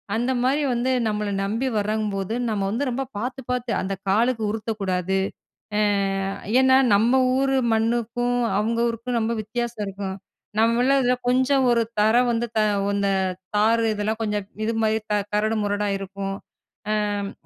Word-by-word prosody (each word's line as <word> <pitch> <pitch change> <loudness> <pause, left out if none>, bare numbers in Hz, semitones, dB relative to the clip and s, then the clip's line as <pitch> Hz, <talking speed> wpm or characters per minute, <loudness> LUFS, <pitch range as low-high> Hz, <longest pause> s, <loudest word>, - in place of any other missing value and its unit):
அந்தமாரி 255 +4 +1
வந்து 245 +2 0 0.2
நம்மள 210 -1 -1
நம்பி 225 +6 -1
வர்றங்கபோது, 210 -1 -1 0.2
நம்ம 205 -2 -1
வந்து 235 +7 -1
ரொம்ப 265 +2 -2
பார்த்து, 255 +4 -4
பார்த்து 250 -1 -2
அந்த 195 +1 -2 0.2
காலுக்கு 225 +3 +2
உருத்தக்கூடாது, 195 -4 -2 0.6
ஏ - - +3 0.8
ஏன்னா, 260 0 +5 0.2
நம்ம 225 +5 +3 0.2
ஊர் 270 0 +1 0.2
மண்ணுக்கும், 235 +2 0 0.2
அவுங்க 230 +2 0
ஊருக்கும் 235 +1 -2
ரொம்ப 225 +1 0
வித்தியாசம் 235 0 -4
இருக்கும். 195 0 -5 0.4
நம்மமேள 240 +4 +3
இதில 250 0 +3
கொஞ்சம் 260 +1 +3
ஒரு 235 -1 +3 0.2
தரம் 240 +4 +4
வந்து 235 +1 0
த - - +4 0.3
அந்த 200 0 +1 0.5
தாறு 225 +2 +3
இதெல்லாம் 215 +2 -2
கொஞ்சம் 210 -2 -1 0.2
இதுமாரி 220 -1 +1
க - - +3 0.2
கரடு 215 +1 +1
முரடா 205 0 -1
இருக்கும். 195 0 -5 0.5
ஆம், 205 -1 -1
225 Hz, 140 wpm, -23 LUFS, 205-245 Hz, 0.8 s, ஏன்னா